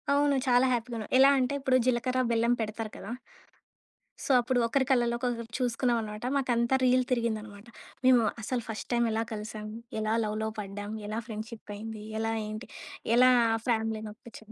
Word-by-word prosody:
అవును. 285 0 +3
చాలా 250 +1 +5
హ్యాపీగా 240 0 -2
ఉన్నా. 215 - -5
ఎలా 275 +1 +8
అంటే 255 +2 0
ఇప్పుడు 260 -1 +3
జీలకర్ర 255 +1 +1
బెల్లం 235 +1 +3
పెడతారు 215 0 -4
కదా! 200 - -8 1.1
సో, - - -6
అప్పుడు 245 +1 +1
ఒకరి 265 +3 +1
కళ్ళలో 240 -2 +2 0.4
చూసుకున్నాం 245 -1 +1
అన్నమాట. 210 +1 -6
మాకు 260 -2 0
అంతా 235 +2 +2
రీల్ 255 0 +4
తిరిగిందన్నమాట 220 -3 -2 0.4
.మేము 250 -2 +6 0.2
అసలు 245 +2 -2
ఫస్ట్ 220 - -5
టైమ్ 235 0 +3
ఎలా 220 +1 0
కలిసాం? 215 0 -6 0.3
ఎలా 215 0 0
లవ్‌లో 215 +1 -2
పడ్డాం? 205 0 -6 0.2
ఎలా 215 +2 -2
ఫ్రెండ్‌షిప్ 220 -1 -7
అయింది? 215 0 -7 0.2
ఎలా 225 0 0
ఏంటి 215 +3 -6 0.5
ఎలా 255 +1 +7 0.4
ఫ్యామిలీనొప్పించాం? 220 0 -3
230 Hz, 155 wpm, -29 LUFS, 215-250 Hz, 1.1 s, ఎలా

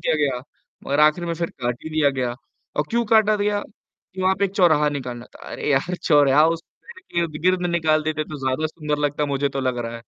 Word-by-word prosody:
दिया 160 - +1
गया, 140 -4 0 0.5
मगर 140 +2 +1
आखिर 155 +3 +4
में 170 - -1
फिर 170 0 -3
काट 120 -1 -3
ही 160 - -6
दिया 155 -2 +3
गया 120 -1 -1 0.4
और 150 - +1
क्यों 235 +1 +1
काटा 215 -1 +5
गया, 205 0 0 0.5
कि 190 - -4
वहाँ 190 +1 +3
पे 200 - +2
एक 195 - -2
चौराहा 155 -6 +4
निकालना 125 -4 -5
था, - - -14
अरे - - -3
यार! 145 +6 +1
चौराहा 145 0 +5
उस 165 0 -1 0.2
पेड़ 470 0 -13
के 175 - -5
इर्द-गिर्द 175 +3 0
निकाल 155 -2 +2
देते 155 0 -2
तो 150 0 -8
ज़्यादा 130 +4 0
सुंदर 150 -1 -3
लगता 145 0 0
मुझे 140 0 0
तो 135 0 -4
लग 130 -2 -1
रहा 115 0 -4
है। 115 - -12
150 Hz, 230 wpm, -22 LUFS, 140-175 Hz, 0.5 s, काटा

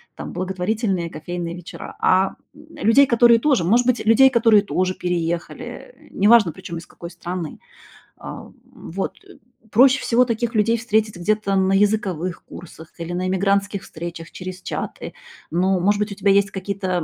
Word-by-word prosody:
там, - - -7
благотворительные 185 -1 -2
кофейные 170 +2 -5
вечера, 175 -1 -10
а, 190 +1 +2 0.2
м, 305 +1 -16
людей, 245 +7 +6
которые 235 -1 +5
тоже 265 - +2
может 240 +6 +3
быть, 250 -2 +1
людей, 260 +5 +6
которые 225 -4 +4
тоже 185 -2 -1
переехали, 170 - -5
неважно, 210 -3 +4
причём 170 +2 -8
из - - -13
какой 170 +1 -10
страны. 175 -2 -6 0.6
А, - - -9
м, - - -18 0.4
вот. 190 +3 -4 0.5
Проще 260 +4 +5
всего 245 +2 +3
таких 235 0 -2
людей 230 +2 +2
встретить 220 -3 0
где-то 200 +2 0
на 190 0 +2
языковых 195 -4 0
курсах 160 -2 -12
или 170 +1 -5
на 180 +1 -2
иммигрантских 200 +1 0
встречах 165 0 -8
через 185 0 -8
чаты. - - -5 0.4
Ну, 185 +3 +1
может 205 +3 +2
быть, 210 0 -2
у - - -4
тебя 200 0 +1
есть 200 +1 +3
какие-то, 190 0 -4
195 Hz, 160 wpm, -21 LUFS, 180-225 Hz, 0.6 s, людей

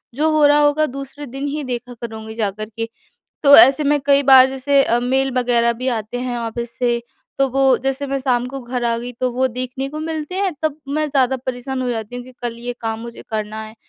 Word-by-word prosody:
जो 305 +4 +2
हो 305 -1 +4
रहा 290 0 +5
होगा, 295 +1 +3
दूसरे 275 +1 -7
दिन 270 +2 -5
ही 295 +1 -3
देखा 250 -1 -5
करुँगी 220 -1 -7
जाकर 215 -1 -3
के। 225 0 -3 0.5
तो 285 -1 +9
ऐसे 265 +6 +7
में 290 0 +2
कई 280 0 +4
बार, 265 -1 +8
जैसे 275 +1 +2
अ, 235 -2 +1
मेल 265 +2 +1
वगैरह 235 -1 +2
भी 250 +3 -5
आते 220 +3 -5
हैं 245 -1 -3
ऑफ़िस 235 0 -5
से, 240 -1 +1 0.4
तो 275 - +4
वो 270 0 +3
जैसे 270 +2 -2
मैं 275 0 -1
शाम 250 -2 0
को 270 +1 -6
घर 245 0 -4
आ 230 0 +1
गई, 240 +1 -6
तो 250 +1 -2
वो 260 +2 +1
देखने 255 +2 -4
को 305 +2 -6
मिलते 315 +2 -4
हैं, 390 -1 0
तब 310 -1 -1
मैं 305 +2 0
ज़्यादा 265 -2 +2
परेशान 260 +1 -3
हो 250 - -1
जाती 225 0 -4
हूँ 245 - -6
कि 255 - -13
कल 235 -1 -4
ये 245 +1 -4
काम 225 -1 -3
मुझे 235 0 -9
करना 215 0 -3
है। 220 0 -11
255 Hz, 235 wpm, -19 LUFS, 235-275 Hz, 0.5 s, तो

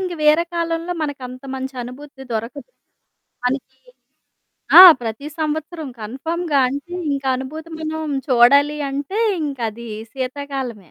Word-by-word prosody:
ఇంక 365 -2 -3
వేరే 310 +3 +5
కాలంలో 335 +1 -2
మనకంత 255 -3 -6
మంచి 265 0 -5
అనుభూతి 265 +2 -11
దొరకదు. 230 - -5 0.8
మనకీ 265 +1 -3 1.0
ఆ! - - +14 0.2
ప్రతి 230 +4 -5
సంవత్సరం 315 0 -3
కన్ఫర్మ్‌గా. 295 +7 -1
అంటే, 285 +7 -6 0.2
ఇంక 275 -1 -3
అనుభూతి 310 +5 -7
మనం 315 -2 -3
చూడాలి 280 +4 +5
అంటే 285 +10 -3 0.2
ఇంకదీ 235 -5 -4 0.2
సీతాకాలమే. 260 - -5
280 Hz, 110 wpm, -20 LUFS, 255-315 Hz, 1.0 s, ఆ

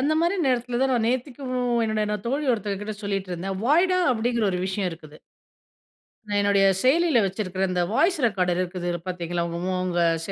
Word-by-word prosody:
அந்தமாரி 315 +6 +2
நேரத்திலதான் 250 +1 +1
நான் 235 -3 +1
நேத்திக்கும் 255 +1 -3 0.3
என்னோட 215 -1 -1
தோழி 280 +5 -1
ஒருத்தங்கக்கிட்ட 205 -1 -3
சொல்லிட்டு 195 -2 -3
இருந்தேன். 190 +2 -4
"வாய்டா!"அப்பிடிங்கிற 270 - +2
ஒரு 180 - -2
விஷயம் 190 0 -1
இருக்குது. 155 -2 -12 1.1
நான் 205 -1 0
என்னுடைய 200 -1 +3 0.2
செயலில 315 +2 +3
வச்சிருக்கிற 190 -1 -3
இந்த 180 -1 0
வாய்ஸ் 340 - +2
ரெக்கார்டர் 180 -5 +1
இருக்குதுல 175 -1 -3
பார்த்தீங்களா, 175 -1 -3
உங்க 170 0 -5
ம் 185 0 -1
உங்க 175 -1 -1 0.2
செ 195 - -5
210 Hz, 150 wpm, -24 LUFS, 185-255 Hz, 1.1 s, என்னுடைய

